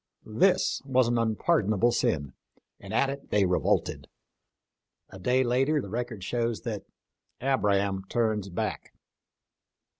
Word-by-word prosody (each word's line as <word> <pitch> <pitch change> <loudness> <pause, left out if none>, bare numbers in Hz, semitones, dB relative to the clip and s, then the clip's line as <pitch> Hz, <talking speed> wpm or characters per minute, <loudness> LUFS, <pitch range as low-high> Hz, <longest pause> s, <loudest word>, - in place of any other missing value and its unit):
This 145 - +2
was 130 -3 +2
an 120 0 +1
unpardonable 110 - +2
sin, 70 - 0 0.5
and - - -10
at 135 0 +2
it 140 0 -9
they 105 -2 +3
revolted. 90 0 0 1.0
A 95 - -10
day 125 +7 +2
later 135 +5 +2
the 100 - -6
record 120 -3 -4
shows 115 +2 -1
that - - -4 0.4
" - - -51
Abram 100 -7 +1
turns 110 -4 0
Back." 90 - -4
115 Hz, 125 wpm, -28 LUFS, 100-130 Hz, 1.0 s, they